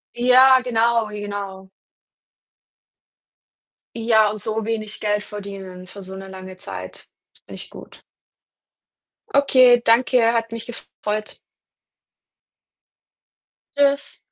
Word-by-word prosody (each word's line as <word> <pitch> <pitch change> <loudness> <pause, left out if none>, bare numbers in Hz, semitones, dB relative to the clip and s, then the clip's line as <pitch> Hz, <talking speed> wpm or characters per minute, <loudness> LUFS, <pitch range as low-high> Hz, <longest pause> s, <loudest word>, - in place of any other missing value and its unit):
Ja, 255 +2 +6
genau, 235 -2 +1
genau. 200 -2 -7 2.3
Ja, 225 -2 +3
und 210 +1 -6
so 220 +1 -3
wenig 215 -1 -4
Geld 210 -1 -1
verdienen 195 -3 -9
für 200 +1 -11
so 190 +1 -9
'ne 195 0 -9
lange 185 0 -10
Zeit, - - -9 0.3
ist - - -25
nicht - - -10
gut. - - -13 1.3
Okay, 255 -3 +5
danke. 230 0 +3
Hat 230 -1 -1
mich 230 0 -6
gefreut. 215 -3 -6 2.4
Tschüss. 280 0 +1
220 Hz, 95 wpm, -21 LUFS, 200-240 Hz, 2.4 s, Ja